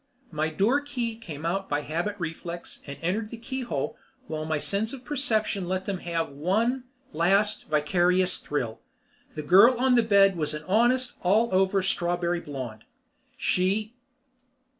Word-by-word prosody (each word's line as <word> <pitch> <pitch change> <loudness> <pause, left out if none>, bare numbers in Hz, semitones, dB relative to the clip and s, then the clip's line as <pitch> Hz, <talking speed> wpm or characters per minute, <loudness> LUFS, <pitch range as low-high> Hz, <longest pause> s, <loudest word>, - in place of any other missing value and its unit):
My 155 0 -1
door 210 - +2
key 245 -6 -3
came 165 -9 -8
out 195 +3 -1
by 145 0 0
habit 170 +8 -2
reflex 170 0 -6
and 140 - -6
entered 210 +6 -1
the 235 - -7
keyhole 255 +2 -3 0.3
while 155 -8 -4
my 155 0 0
sense 205 - -1
of 260 -2 -9
perception 220 -9 0
let 185 +1 -2
them 195 -3 -3
have 165 -4 -2
one 220 - 0 0.3
last 195 +6 +2
vicarious 180 +4 +2
thrill. 120 -6 -3 0.6
The 150 - -4
girl 205 - +6
on 260 0 +3
the 240 - +6
bed 200 -3 +5
was 150 -1 0
an 150 - -6
honest 240 +5 +2
allover 195 -1 +3
strawberry 175 -1 0
blonde. 130 -8 -7 0.5
She.... 205 +5 0
185 Hz, 145 wpm, -27 LUFS, 160-225 Hz, 0.6 s, girl